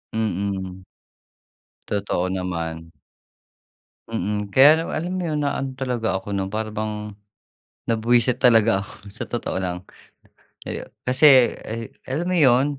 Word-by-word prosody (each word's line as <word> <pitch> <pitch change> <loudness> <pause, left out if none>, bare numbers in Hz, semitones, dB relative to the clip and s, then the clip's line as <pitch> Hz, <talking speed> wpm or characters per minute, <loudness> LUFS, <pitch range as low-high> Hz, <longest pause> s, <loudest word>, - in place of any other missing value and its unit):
Mm. 95 -3 -2 1.1
Totoo 100 -3 -1
naman. 85 -3 -4 1.2
Mm, 105 -2 -2
kaya 135 +2 +9
naman 165 - -4
alam 175 +3 -3
mo - - -2
'yon 155 -2 -1
na 140 - +2
ano 135 - -2
talaga 125 -4 -2
ako 95 +2 -5
nun, 95 -1 -1
para 110 +2 -3
bang 105 0 -4 0.7
nabuwisit 120 +2 +2
talaga 115 -4 +5
ako 100 0 -11
sa 115 - -7
totoo 120 -5 -3
lang. 90 0 -4 0.8
Eh, - - -4 0.2
kasi, 130 -1 +6
eh, 115 0 -5 0.2
alam 150 +7 -3
mo 185 - 0
'yon, 130 -4 +5
110 Hz, 130 wpm, -23 LUFS, 100-125 Hz, 1.2 s, kaya